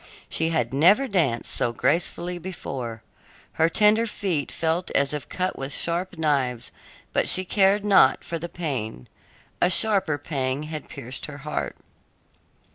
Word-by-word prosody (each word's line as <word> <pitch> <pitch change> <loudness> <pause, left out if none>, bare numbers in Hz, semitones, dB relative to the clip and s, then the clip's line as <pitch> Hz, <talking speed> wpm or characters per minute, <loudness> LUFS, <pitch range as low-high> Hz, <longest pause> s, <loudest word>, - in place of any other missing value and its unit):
She 160 0 0
had 130 -7 -1
never 190 - +5
danced 155 - 0
so 120 - 0
gracefully 170 +7 -1
before. 130 -10 -6 0.5
Her 160 +1 +2
tender 215 +4 +4
feet 180 -9 -2
felt 165 +2 -1
as 140 +1 +2
if 150 -2 -5
cut 185 0 -2
with 135 +1 -4
sharp 175 +4 -2
knives, 135 -6 0 0.4
but - - +2
she 185 - +5
cared 200 +2 +3
not 200 -2 +5
for 165 - -4
the 170 +2 -6
pain; 125 - -4 0.5
a 175 - +5
sharper 195 -6 +3
pang 135 -2 -2
had 155 -1 -7
pierced 125 +3 -7
her 145 -1 -8
heart. 150 - -3
160 Hz, 145 wpm, -24 LUFS, 135-185 Hz, 0.5 s, never